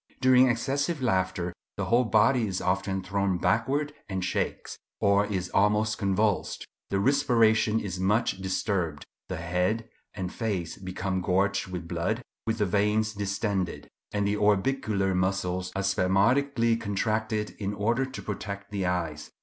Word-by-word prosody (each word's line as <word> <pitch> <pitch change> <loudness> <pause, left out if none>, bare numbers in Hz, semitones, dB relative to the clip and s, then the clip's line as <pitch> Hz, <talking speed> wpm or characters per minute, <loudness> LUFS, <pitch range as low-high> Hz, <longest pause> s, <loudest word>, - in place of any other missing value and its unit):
During 130 0 +6
excessive 140 +6 0
laughter 95 -5 0 0.2
the - - -1
whole 120 +2 +3
body 115 +2 +3
is 95 -2 -2
often 95 +1 -1
thrown 100 -1 0
backward 140 - +1 0.2
and 95 -2 -2
shakes, - - -2 0.2
or 100 +1 +3
is 95 -4 -2
almost 105 +2 +2
convulsed; 100 0 0 0.2
the 100 - 0
respiration 115 -3 +3
is 95 -4 -4
much 95 +1 +1
disturbed; 95 -5 -1 0.2
the 90 - -3
head 90 +7 -1 0.3
and 95 -3 -4
face 100 -8 -2
become 95 0 -3
gorged 95 +2 +1
with 90 -2 -6
blood, 90 +8 -2 0.2
with 110 0 0
the 105 - +2
veins 105 +3 +1
distended; 100 -2 -2 0.2
and 100 0 0
the 105 +1 0
orbicular 105 -1 +1
muscles 90 -1 -1
are 95 - -1
spasmodically 115 +6 +2
contracted 110 +1 -1
in 100 -1 -2
order 115 +6 +1
to 135 0 -6
protect 100 -1 -5
the 100 -3 -1
eyes. 80 -4 -2
100 Hz, 140 wpm, -27 LUFS, 95-110 Hz, 0.3 s, During